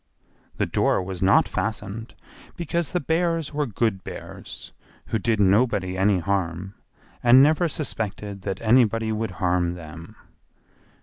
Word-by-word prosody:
The -, -, +1 dB
door -, -, +1 dB
was 95 Hz, -1 st, -6 dB
not 95 Hz, +1 st, +4 dB
fastened, 110 Hz, +1 st, -4 dB, 0.4 s
because 170 Hz, 0 st, -2 dB
the 180 Hz, -, 0 dB
bears 165 Hz, 0 st, 0 dB
were 145 Hz, -1 st, -1 dB
good 105 Hz, -3 st, -1 dB
bears, -, -, -9 dB, 0.4 s
who 110 Hz, -, 0 dB
did 110 Hz, 0 st, 0 dB
nobody 100 Hz, -2 st, +2 dB
any 95 Hz, +1 st, +3 dB
harm, 90 Hz, 0 st, -2 dB, 0.5 s
and 125 Hz, +2 st, +7 dB
never 155 Hz, +4 st, +3 dB
suspected 105 Hz, -9 st, -4 dB
that 95 Hz, 0 st, -4 dB
anybody 115 Hz, -1 st, +3 dB
would 110 Hz, +1 st, -2 dB
harm 90 Hz, -1 st, +1 dB
them. 85 Hz, +4 st, -10 dB
105 Hz, 130 wpm, -24 LUFS, 95-125 Hz, 0.5 s, and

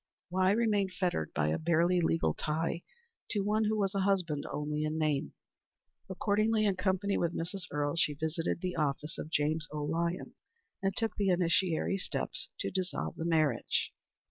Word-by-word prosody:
Why 185 Hz, +1 st, +3 dB
remain 205 Hz, -2 st, +2 dB
fettered 180 Hz, -, -1 dB
by 75 Hz, 0 st, +2 dB
a 80 Hz, -, 0 dB
bare 170 Hz, +1 st, +3 dB
legal 175 Hz, -2 st, +2 dB
tie 165 Hz, +2 st, -1 dB, 0.5 s
to 205 Hz, -, +1 dB
one 215 Hz, +2 st, +2 dB
who 215 Hz, +1 st, +1 dB
was 195 Hz, -2 st, +1 dB
a 195 Hz, -, 0 dB
husband 185 Hz, -7 st, +1 dB
only 150 Hz, +1 st, -2 dB
in 155 Hz, +1 st, -1 dB
name? 150 Hz, -3 st, 0 dB, 0.7 s
Accordingly, 215 Hz, +3 st, +2 dB
in 200 Hz, -2 st, +2 dB
company 190 Hz, +1 st, +1 dB
with 170 Hz, -1 st, 0 dB
Mrs. 180 Hz, +2 st, -3 dB
Earle, 145 Hz, 0 st, -1 dB
she 150 Hz, -3 st, +2 dB
visited 160 Hz, +3 st, -2 dB
the 180 Hz, -1 st, -2 dB
office 150 Hz, +1 st, -1 dB
of -, -, -5 dB
James 155 Hz, +1 st, +1 dB
O. 150 Hz, -1 st, -3 dB
Lyons, 170 Hz, +4 st, -1 dB, 0.5 s
and 195 Hz, 0 st, 0 dB
took 225 Hz, -1 st, 0 dB
the 200 Hz, -2 st, +2 dB
initiatory 180 Hz, +1 st, +2 dB
steps -, -, -3 dB
to -, -, -2 dB
dissolve 185 Hz, -1 st, -2 dB
the 165 Hz, -, -4 dB
marriage. 155 Hz, -7 st, +1 dB
170 Hz, 170 wpm, -32 LUFS, 155-195 Hz, 0.7 s, Why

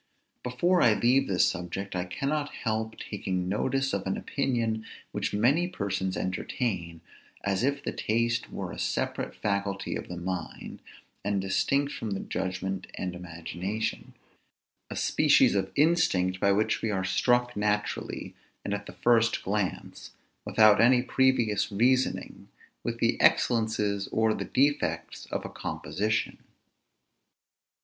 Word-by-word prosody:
Before 175 Hz, +9 st, +2 dB
I 110 Hz, -3 st, +5 dB
leave 125 Hz, +5 st, +3 dB
this 90 Hz, -2 st, +3 dB
subject, 90 Hz, +3 st, -3 dB
I 90 Hz, 0 st, -1 dB
cannot 140 Hz, +11 st, -2 dB
help 110 Hz, 0 st, -3 dB
taking 95 Hz, -3 st, -3 dB
notice 135 Hz, +7 st, 0 dB
of 100 Hz, -1 st, -2 dB
an 95 Hz, -, -1 dB
opinion 115 Hz, -5 st, -1 dB, 0.3 s
which -, -, -2 dB
many 135 Hz, +12 st, +3 dB
persons 95 Hz, -, -2 dB
entertain, 90 Hz, -3 st, -3 dB, 0.4 s
as 100 Hz, +2 st, 0 dB
if 140 Hz, +1 st, 0 dB
the -, -, -2 dB
taste 115 Hz, +1 st, 0 dB
were -, -, -5 dB
a -, -, -8 dB
separate -, -, -2 dB
faculty 100 Hz, -1 st, -2 dB
of -, -, -5 dB
the 90 Hz, -, -6 dB
mind, 90 Hz, +1 st, -5 dB, 0.4 s
and 100 Hz, 0 st, 0 dB
distinct 140 Hz, +9 st, +1 dB
from 110 Hz, -3 st, -4 dB
the -, -, -3 dB
judgment 95 Hz, 0 st, -3 dB
and 90 Hz, -1 st, -3 dB
imagination; 90 Hz, +4 st, -4 dB, 0.7 s
a -, -, -6 dB
species -, -, +4 dB
of 95 Hz, -1 st, 0 dB
instinct, 120 Hz, -, +3 dB
by 100 Hz, -, +3 dB
which 105 Hz, +2 st, +1 dB
we 110 Hz, -, -1 dB
are 95 Hz, -2 st, -1 dB
struck 120 Hz, +5 st, +2 dB
naturally, 105 Hz, 0 st, -2 dB, 0.3 s
and 100 Hz, -, -1 dB
at 100 Hz, 0 st, -4 dB
the -, -, -9 dB
first 115 Hz, -1 st, +2 dB
glance, 100 Hz, -1 st, -3 dB, 0.3 s
without 110 Hz, -1 st, +6 dB
any 125 Hz, +1 st, +5 dB
previous 125 Hz, -7 st, +2 dB
reasoning, 125 Hz, +5 st, +1 dB, 0.4 s
with -, -, -2 dB
the -, -, +1 dB
excellences 105 Hz, -3 st, +2 dB
or 110 Hz, 0 st, +2 dB
the -, -, -4 dB
defects 145 Hz, +3 st, 0 dB
of -, -, -4 dB
a -, -, -4 dB
composition. 110 Hz, +2 st, -2 dB
105 Hz, 135 wpm, -28 LUFS, 95-120 Hz, 0.7 s, without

